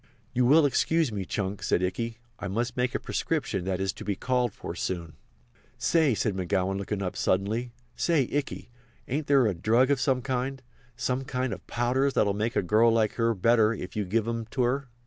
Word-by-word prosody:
"You 125 0 +3
will 150 +3 +6
excuse 160 +1 +2
me, 100 -3 -3
Chunk," 100 +1 -3
said 90 -1 +1
Ikey. 115 +5 -2 0.2
"I - - -4
must 115 +5 -2
make 125 0 0
a - - +1
prescription 125 - -2
that 95 -1 -1
is 95 -1 -1
to - - -9
be 100 - -1
called 125 0 0
for - - -7
soon." 85 -4 -4 0.6
"Say," 155 -7 +3
said 110 0 0
McGowan, 95 +1 -1
looking 100 0 -3
up 90 - -3
suddenly, 110 +6 0 0.2
"say, 155 -7 +2
Ikey, 145 -4 -3 0.4
ain't 145 +3 -2
there 140 -3 +5
a 105 - +2
drug 115 +9 +3
of 135 -3 +1
some 130 -3 +1
kind—some 130 0 -4
kind 130 -2 -2
of - - -10
powders 130 +3 +1
that'll 100 -2 +3
make 110 +4 -2
a - - +2
girl 110 +5 +4
like 110 -2 +1
you 115 0 +2
better 115 +2 +4
if 90 -2 -7
you 105 - 0
give 110 +4 0
'em 115 -1 -3
to 125 +2 -1
her?" 130 +2 0
115 Hz, 200 wpm, -27 LUFS, 100-130 Hz, 0.6 s, will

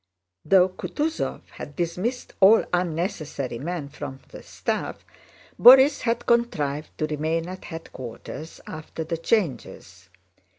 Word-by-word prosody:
Though 185 -2 +5
Kutúzov 305 - -3
had 145 - -9
dismissed 180 - -3
all 205 +4 +7
unnecessary 165 - -2
men 165 0 -4
from 140 -2 -8
the - - -10
staff, - - -4 0.5
Borís 265 +3 +8
had 235 0 -1
contrived 155 -12 0
to 155 - 0
remain 160 +2 -1
at 185 +1 -8
headquarters 155 -1 -8
after 155 +1 -6
the 165 +1 -3
changes. 130 - -2
165 Hz, 115 wpm, -25 LUFS, 150-200 Hz, 0.5 s, Borís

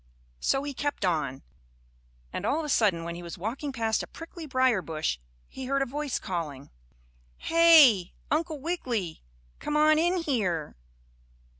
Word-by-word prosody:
So 270 0 +1
he 285 0 -4
kept 285 -5 -2
on, 155 -7 -1 0.9
and - - -4
all 290 - +1
of 320 - -2
a - - -5
sudden 200 -10 +2
when 170 0 -4
he 175 - -7
was 170 +1 -8
walking 240 - -4
past 225 -3 0
a - - -7
prickly 330 -1 -9
briar 255 -6 +2
bush, 155 - -2 0.3
he 265 - -8
heard 275 +1 +1
a - - -2
voice 290 +2 -3
calling: 155 -8 -5 0.7
"Hey, 315 - +6 0.2
Uncle 310 0 0
Wiggily, 250 - -3 0.4
come 300 0 -1
on 310 0 +5
in 350 +3 +2
here." 185 - -1
255 Hz, 155 wpm, -28 LUFS, -, 0.9 s, Hey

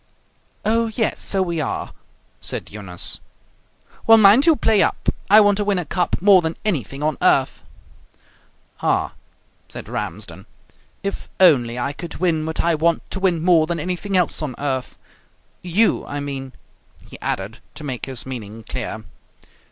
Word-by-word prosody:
"Oh, 230 +1 +2
yes, 225 - 0
so 195 -1 +2
we 170 -3 -2
are!" - - -4 0.5
said - - -5
Eunice. 95 -4 -5 0.9
"Well, 225 0 +9
mind 215 +8 +6
you 325 - +7
play 220 -4 +3
up. - - 0 0.2
I 210 +2 +9
want 205 -2 +4
to 210 - 0
win 205 -1 +1
a 180 - -2
cup 175 +4 -1
more 195 -1 +6
than 160 0 -3
anything 140 - -2
on 155 +1 -1
earth." 140 -7 +2 1.2
"Ah!" - - 0 0.6
said - - -8
Ramsden, - - -6 0.6
"if 200 0 -4
only 125 -10 +5
I 140 +3 -2
could 170 +3 -7
win 160 -3 0
what 160 - -1
I 170 - +2
want 165 +2 +1
to 190 - -3
win 180 -4 +1
more 170 -3 +4
than 170 0 -2
anything 185 +4 -2
else 180 -3 +1
on 140 -5 -4
earth! 135 -3 -3 0.6
You, 185 +6 +2
I 145 - -4
mean," 135 -2 -5 0.5
he - - -12
added, 100 +4 -3 0.2
to 155 - -9
make 130 -4 -4
his 130 -3 -6
meaning 115 -4 -7
clear. 110 -3 -5
165 Hz, 160 wpm, -21 LUFS, 135-195 Hz, 1.2 s, Well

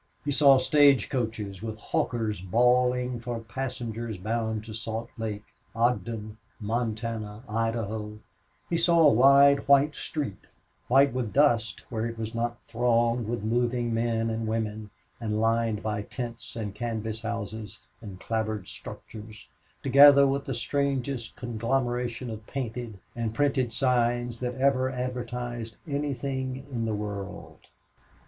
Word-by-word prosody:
He 145 - 0
saw 140 -1 +6
stage 140 -2 +4
coaches 110 -6 -3
with 110 -1 -5
hawkers 110 -2 -1
bawling 125 +4 +2
for 120 0 -4
passengers 115 -1 -5
bound 110 +2 -2
to 110 - -8
Salt 115 +1 -5
Lake, 105 -2 -4 0.3
Ogden, 115 -2 -1 0.2
Montana, 110 -1 -3
Idaho; 110 -1 -2 0.5
he 170 - 0
saw 170 0 +4
a - - +6
wide 140 +3 +6
white 140 +2 +5
street 145 -13 -5 0.4
white 135 +2 +5
with 125 -4 -2
dust 115 -8 +2
where 115 0 -1
it 115 0 -6
was 110 0 -4
not 120 +1 -2
thronged 120 0 +1
with 115 -2 -3
moving 120 +1 0
men 115 0 0
and 110 0 -2
women, 110 -1 -2 0.3
and 110 -2 -2
lined 115 -1 +1
by 105 -1 -1
tents 120 +2 -7
and 105 -4 -4
canvas 110 -1 -3
houses 110 -2 -5 0.2
and 100 -4 -9
clapboard 110 -3 -2
structures, 110 0 -10 0.3
together 140 0 +8
with 140 +1 0
the 135 - -3
strangest 135 -2 -2
conglomeration 120 0 -2
of 110 0 -8
painted 120 -5 -4 0.2
and 115 -2 -3
printed 135 -3 +1
signs 120 -1 +1
that 125 -1 -3
ever 130 -1 +2
advertised 120 -2 -4
anything 135 -2 -3
in 115 -3 -2
the 110 -1 -1
world. 100 -1 -6
115 Hz, 130 wpm, -27 LUFS, 110-125 Hz, 0.5 s, together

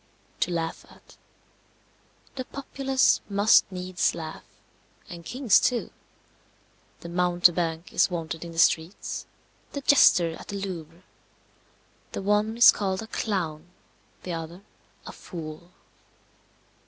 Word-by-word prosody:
To - - 0
laugh 165 -1 -3
at. - - -19 1.2
The 260 -1 -5
populace 270 -1 +1
must 200 0 +4
needs 180 -1 -1
laugh, 160 -1 -7 0.6
and 170 -1 -9
kings 245 +2 +3
too. 245 -2 0 1.1
The 170 - -8
mountebank 175 -1 +1
is - - +3
wanted 165 -2 -5
in 170 - -8
the 165 - -11
streets, 165 +2 +1 0.5
the 280 - -4
jester 180 -12 +5
at - - -12
the 200 - -6
Louvre. 175 -3 -7 1.1
The - - -4
one 210 +3 +1
is 240 - +9
called 190 0 -2
a - - -10
Clown, 175 -9 -3 0.6
the 180 - -4
other 165 +3 -7 0.4
a - - -7
Fool. 165 -1 -9
180 Hz, 115 wpm, -26 LUFS, 165-210 Hz, 1.2 s, is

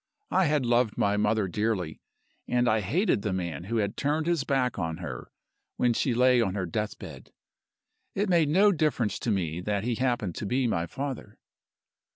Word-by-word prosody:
I 190 - +3
had 150 -4 +1
loved 120 -2 +2
my 100 0 +2
mother 105 0 +1
dearly; 95 -4 -2 0.5
and 125 0 +1
I 110 -1 +3
hated 135 - +1
the 100 - -2
man 85 -3 -3
who 115 +4 -2
had 100 -2 -1
turned 150 +2 0
his 170 -4 +1
back 130 -5 0
on 80 -2 -2
her 85 -9 -7 0.5
when 120 -1 +2
she 120 +1 0
lay 125 0 +4
on 95 -4 -1
her 95 -3 -1
deathbed. 105 +5 -5 0.8
It 205 +2 0
made 170 -5 +3
no 200 +6 +5
difference 150 - 0
to - - -3
Me 90 -5 -1
that 100 +1 -1
he 120 +1 0
happened 120 -6 -1
to 105 - -4
be 130 +4 +1
my 85 -7 0
father. 135 -5 -6
115 Hz, 185 wpm, -27 LUFS, 100-135 Hz, 0.8 s, no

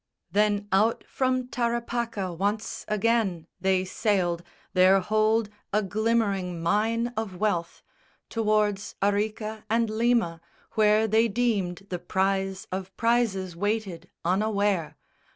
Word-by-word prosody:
Then 205 0 +2
out 215 +4 +2
from 255 -1 0
Tarapaca 235 -5 -2
once 205 +5 -2
again 210 -5 +1
They 190 0 +2
sailed, 185 -4 0 0.3
their 185 +1 +6
hold 215 +3 +2 0.2
a 210 +1 +2
glimmering 200 -3 0
mine 225 +7 +1
of 215 -4 -3
wealth, 175 -5 -1 0.4
Towards 215 -2 0
Arica 215 +2 -1
and 230 0 +1
Lima, 225 -7 +1 0.3
where 215 0 +4
they 220 +2 +4
deemed 200 -5 -1
The 180 - -2
prize 190 +1 -1
of 190 0 -5
prizes 220 -6 +1
waited 205 -2 -2 0.2
unaware. 200 -2 +1
210 Hz, 110 wpm, -26 LUFS, 190-225 Hz, 0.4 s, their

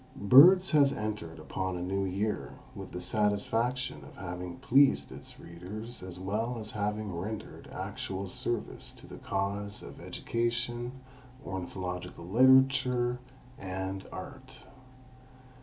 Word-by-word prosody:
Birds 175 - +8
has 145 -3 +5
entered 105 -6 -4
upon 95 -1 -3
a - - -4
new 95 +2 0
year 100 +3 -2 0.2
with - - -8
the 90 - -5
satisfaction 115 +6 0
of - - -13
having 90 -1 -6
pleased 130 - +4
its - - -7
readers 105 +8 -7
as 90 -1 -6
well 110 +6 -1
as 110 -1 -6
having 105 -1 -2
rendered 105 +5 -6
actual 95 0 -4
service 115 +4 -2
to - - -14
the - - -10
cause 100 +1 -2
of - - -10
education, 120 +1 -2 0.5
ornithological 90 -2 -5
literature 125 +2 +4 0.4
and 95 0 -4
art. 130 -1 -9
105 Hz, 120 wpm, -30 LUFS, 95-120 Hz, 0.5 s, Birds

